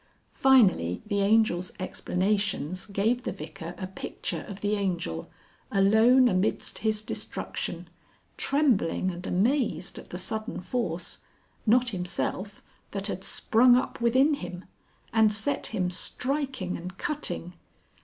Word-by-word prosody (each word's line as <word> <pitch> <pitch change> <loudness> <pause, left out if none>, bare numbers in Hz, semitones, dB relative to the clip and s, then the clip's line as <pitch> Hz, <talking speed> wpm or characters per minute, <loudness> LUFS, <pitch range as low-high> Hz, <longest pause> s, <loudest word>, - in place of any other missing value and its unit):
Finally 200 - +4
the 205 -1 0
Angel's 200 -3 +3
explanations 185 -2 -1
gave 215 +5 +1
the - - -3
Vicar 160 +2 -8
a 185 - -4
picture 190 +1 -5
of 200 0 -8
the 205 0 0
Angel 175 - -2 0.4
alone 220 +6 +5
amidst 185 -2 0
his 215 -1 0
destruction, - - -4 0.5
trembling 235 - +2
and 175 +1 -7
amazed 230 +2 0
at - - -13
the 180 - -5
sudden 215 +5 -4
force, 180 -4 -3 0.5
not 245 +3 +4
himself, 190 +1 -3 0.3
that 200 0 -4
had 190 -2 -3
sprung 245 +2 +5
up 250 - -1
within 260 +6 +4
him, 180 -8 -6 0.5
and 220 -1 +5
set 220 +7 -1
him 185 -5 -1
striking 260 -1 -1
and 180 +2 -7
cutting. 275 - -3
200 Hz, 125 wpm, -27 LUFS, 180-235 Hz, 0.5 s, alone